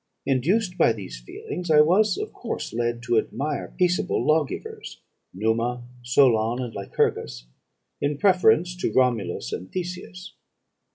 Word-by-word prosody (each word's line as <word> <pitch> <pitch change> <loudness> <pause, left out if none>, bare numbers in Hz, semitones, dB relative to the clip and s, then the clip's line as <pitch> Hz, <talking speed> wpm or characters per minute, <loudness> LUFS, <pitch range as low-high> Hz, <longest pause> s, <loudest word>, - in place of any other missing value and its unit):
Induced 180 - +1
by 115 - +5
these 95 - -8
feelings, 175 - -7
I 150 -1 +7
was 195 - +3
of 425 +1 -5
course 235 - -5
led 120 0 -2
to 115 -1 +3
admire 145 +5 -4
peaceable 180 0 +1
lawgivers, 155 -2 -1 0.3
Numa, 115 +5 -1 0.2
Solon, 120 -2 +3
and 120 -3 -4
Lycurgus, 65 -10 -2 0.6
in 145 0 0
preference 180 -1 +3
to 175 - -1
Romulus 120 -6 0
and 90 - -6
Theseus. 180 +1 -6
135 Hz, 125 wpm, -24 LUFS, 115-180 Hz, 0.6 s, I